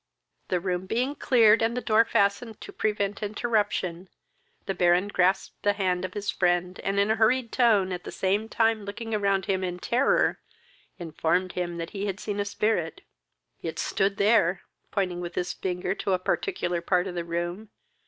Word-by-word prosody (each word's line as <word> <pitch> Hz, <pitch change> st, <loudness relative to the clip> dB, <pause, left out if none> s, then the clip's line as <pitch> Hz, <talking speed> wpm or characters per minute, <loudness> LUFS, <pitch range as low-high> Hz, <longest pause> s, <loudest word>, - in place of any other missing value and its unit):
The 180 Hz, -, 0 dB
room 180 Hz, 0 st, -2 dB
being 250 Hz, +7 st, 0 dB
cleared, 230 Hz, -6 st, +4 dB
and 230 Hz, +2 st, +1 dB
the -, -, +2 dB
door 225 Hz, -1 st, +3 dB
fastened, 210 Hz, +1 st, 0 dB
to -, -, -9 dB
prevent 205 Hz, -1 st, -1 dB
interruption, 205 Hz, -5 st, -1 dB, 0.6 s
the 195 Hz, -, -1 dB
Baron 180 Hz, +2 st, +3 dB
grasped 185 Hz, -1 st, 0 dB
the 205 Hz, -, +2 dB
hand 185 Hz, -3 st, 0 dB
of 185 Hz, -, -8 dB
his 205 Hz, -1 st, -2 dB
friend, 175 Hz, 0 st, 0 dB
and 195 Hz, +1 st, -1 dB
in 200 Hz, +2 st, +3 dB
a 220 Hz, -, +1 dB
hurried 230 Hz, +2 st, +2 dB
tone, 215 Hz, -7 st, +3 dB
at 180 Hz, -1 st, -4 dB
the -, -, -7 dB
same 205 Hz, +4 st, 0 dB
time 225 Hz, -2 st, +1 dB
looking 225 Hz, +3 st, -6 dB
around 200 Hz, -3 st, +1 dB
him 190 Hz, -1 st, 0 dB
in 180 Hz, -1 st, -3 dB
terror, 245 Hz, +8 st, +2 dB, 0.6 s
informed 175 Hz, +1 st, -1 dB
him 175 Hz, -1 st, -3 dB
that 165 Hz, 0 st, -5 dB
he 205 Hz, -1 st, -3 dB
had 195 Hz, 0 st, -3 dB
seen 205 Hz, -1 st, -4 dB
a 205 Hz, -, 0 dB
spirit. 200 Hz, -5 st, -1 dB, 0.6 s
"It 165 Hz, -1 st, -5 dB
stood 195 Hz, +1 st, 0 dB
there!" 200 Hz, -4 st, +3 dB, 0.3 s
pointing 185 Hz, -3 st, -1 dB
with 175 Hz, 0 st, -6 dB
his 180 Hz, 0 st, -2 dB
finger 180 Hz, 0 st, -2 dB
to 195 Hz, -1 st, -2 dB
a -, -, +3 dB
particular 180 Hz, -, -1 dB
part 180 Hz, +1 st, +1 dB
of 190 Hz, -, -5 dB
the 175 Hz, -1 st, -3 dB
room. 175 Hz, +5 st, -4 dB
195 Hz, 185 wpm, -26 LUFS, 180-215 Hz, 0.6 s, cleared